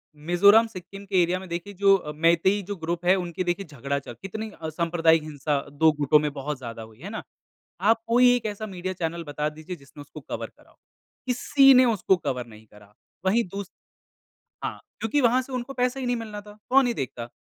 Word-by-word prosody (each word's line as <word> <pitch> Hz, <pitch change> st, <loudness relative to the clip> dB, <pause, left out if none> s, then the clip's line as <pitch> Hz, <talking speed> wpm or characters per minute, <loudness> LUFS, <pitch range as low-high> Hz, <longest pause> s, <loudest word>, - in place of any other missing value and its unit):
मिज़ोरम-सिक्किम 195 Hz, +4 st, +3 dB
के 190 Hz, -2 st, +2 dB
एरिया 175 Hz, +2 st, +1 dB
में 190 Hz, -, -10 dB
देखिए 175 Hz, +4 st, -5 dB
जो 195 Hz, -6 st, +3 dB
मैतेई 170 Hz, +5 st, +3 dB
जो 205 Hz, -, -3 dB
ग्रुप 170 Hz, 0 st, -4 dB
है 185 Hz, -, +5 dB
उनके 180 Hz, -1 st, -3 dB
देखिए 175 Hz, +3 st, -2 dB
झगड़ा 140 Hz, -1 st, -3 dB
चल 125 Hz, -, -10 dB
कितनी 215 Hz, +3 st, -6 dB
सांप्रदायिक 165 Hz, 0 st, +2 dB
हिंसा 145 Hz, -1 st, -2 dB
2 160 Hz, +2 st, +4 dB
गुटों 150 Hz, +1 st, +5 dB
में 150 Hz, -1 st, -1 dB
बहुत 145 Hz, 0 st, -4 dB
ज़्यादा 115 Hz, -3 st, -8 dB
हुई 110 Hz, +1 st, -15 dB
है 190 Hz, +6 st, -7 dB
ना। 220 Hz, -, -6 dB, 0.6 s
आप 225 Hz, +3 st, +3 dB
कोई 245 Hz, +1 st, +5 dB
एक 230 Hz, -, -4 dB
ऐसा 210 Hz, +1 st, -4 dB
मीडिया 185 Hz, -2 st, -5 dB
चैनल 170 Hz, -1 st, -3 dB
बता 150 Hz, +1 st, -2 dB
दीजिए 155 Hz, +4 st, -8 dB
जिसने 140 Hz, -1 st, -15 dB
उसको 145 Hz, -, -11 dB
कवर -, -, -5 dB
करा -, -, -24 dB
हो। -, -, -27 dB, 0.5 s
किसी 270 Hz, +2 st, +5 dB
ने 255 Hz, 0 st, +7 dB
उसको 210 Hz, -5 st, +2 dB
कवर 125 Hz, -7 st, -3 dB
नहीं 110 Hz, -1 st, -15 dB
करा 105 Hz, 0 st, -19 dB, 0.3 s
वहीं 230 Hz, +5 st, +3 dB
दूस 200 Hz, -1 st, -5 dB, 0.9 s
हाँ, -, -, -4 dB, 0.2 s
क्योंकि 255 Hz, +6 st, +1 dB
वहाँ 245 Hz, +1 st, +4 dB
से 260 Hz, +1 st, -10 dB
उनको 255 Hz, +2 st, -4 dB
पैसे 250 Hz, +1 st, 0 dB
ही 255 Hz, -, -3 dB
नहीं 245 Hz, -, +1 dB
मिलना 215 Hz, -3 st, -6 dB
था 210 Hz, 0 st, -14 dB
कौन 265 Hz, 0 st, +5 dB
ही 240 Hz, -, 0 dB
देखता 120 Hz, -, -5 dB
180 Hz, 205 wpm, -25 LUFS, 150-220 Hz, 0.9 s, ने